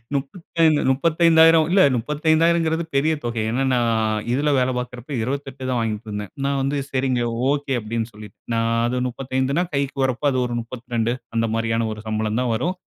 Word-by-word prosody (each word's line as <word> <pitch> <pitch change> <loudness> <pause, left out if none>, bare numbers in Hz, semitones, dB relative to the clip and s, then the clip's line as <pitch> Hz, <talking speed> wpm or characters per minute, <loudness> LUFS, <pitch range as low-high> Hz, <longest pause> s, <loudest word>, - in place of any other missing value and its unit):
முப்பத்தைந் 160 +2 +1
35000, 165 +2 +5
இல்ல 190 +1 +5 0.2
35000ங்கிறது 160 +4 +1
பெரிய 155 +4 +3
தொகை. 120 -2 -2
ஏன்னா, 130 +3 0
நா 125 - +3 0.5
இதுல 145 +3 +1
வேல 125 0 +1
பார்க்குறப்ப 125 +1 -6
28 135 +1 -4
தான் 125 -1 0
வாங்கிட்ருந்தேன். 105 -2 -4
நா 140 - +1
வந்து 135 +2 -1
"சரிங்க. 130 -2 0 0.3
ஓகே." 145 -1 -1
அப்படீன்னு 115 +1 -3
சொல்லிட்டு. 105 -2 -12 0.2
நா - - +1 0.3
அது 125 +1 -1
35 130 +5 -1
கைக்கு 140 0 -2
வரப்ப 130 +1 -3
அது 130 - 0
ஒரு 120 -1 -3
32 120 -1 -3 0.2
அந்த 115 0 +1
மாரியான 115 0 0
ஒரு 105 - -9
சம்பளம் 110 +1 -1
தான் 125 -2 0
வரும். 170 +11 -1
130 Hz, 160 wpm, -22 LUFS, 115-150 Hz, 0.5 s, 35000